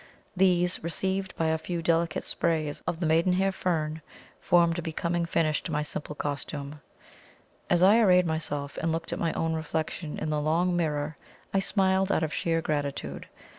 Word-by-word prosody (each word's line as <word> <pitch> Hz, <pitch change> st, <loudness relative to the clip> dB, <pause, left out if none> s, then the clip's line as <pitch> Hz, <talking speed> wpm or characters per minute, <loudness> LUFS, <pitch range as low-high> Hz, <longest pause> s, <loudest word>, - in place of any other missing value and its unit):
These, 180 Hz, -2 st, +2 dB
relieved 190 Hz, +3 st, -2 dB
by 160 Hz, -1 st, +1 dB
a 160 Hz, 0 st, +1 dB
few 170 Hz, 0 st, -4 dB
delicate 165 Hz, -1 st, +1 dB
sprays 155 Hz, -3 st, -1 dB
of 165 Hz, -, -1 dB
the 175 Hz, -, -1 dB
maiden 165 Hz, +3 st, +3 dB
hair 195 Hz, +1 st, +2 dB
fern, 160 Hz, -4 st, -1 dB, 0.4 s
formed 170 Hz, -1 st, +3 dB
a -, -, -2 dB
becoming 170 Hz, +1 st, -1 dB
finish 155 Hz, -3 st, +1 dB
to -, -, -6 dB
my 150 Hz, 0 st, 0 dB
simple 150 Hz, 0 st, -5 dB
costume. 145 Hz, 0 st, -4 dB, 0.9 s
As 175 Hz, 0 st, +4 dB
I 205 Hz, +5 st, +7 dB
arrayed 180 Hz, -5 st, +5 dB
myself, 155 Hz, -3 st, -3 dB
and 165 Hz, -, 0 dB
looked 165 Hz, +1 st, -3 dB
at -, -, -4 dB
my 165 Hz, -, +1 dB
own 165 Hz, 0 st, -1 dB
reflection 160 Hz, 0 st, -3 dB
in 155 Hz, -, -2 dB
the 150 Hz, -1 st, 0 dB
long 170 Hz, +4 st, +1 dB
mirror, 150 Hz, -3 st, -1 dB, 0.4 s
I 195 Hz, -, +3 dB
smiled 190 Hz, -1 st, +2 dB
out 165 Hz, -, +2 dB
of 155 Hz, -2 st, -2 dB
sheer 165 Hz, +1 st, 0 dB
gratitude. 140 Hz, -, -3 dB
165 Hz, 175 wpm, -28 LUFS, 155-175 Hz, 0.9 s, I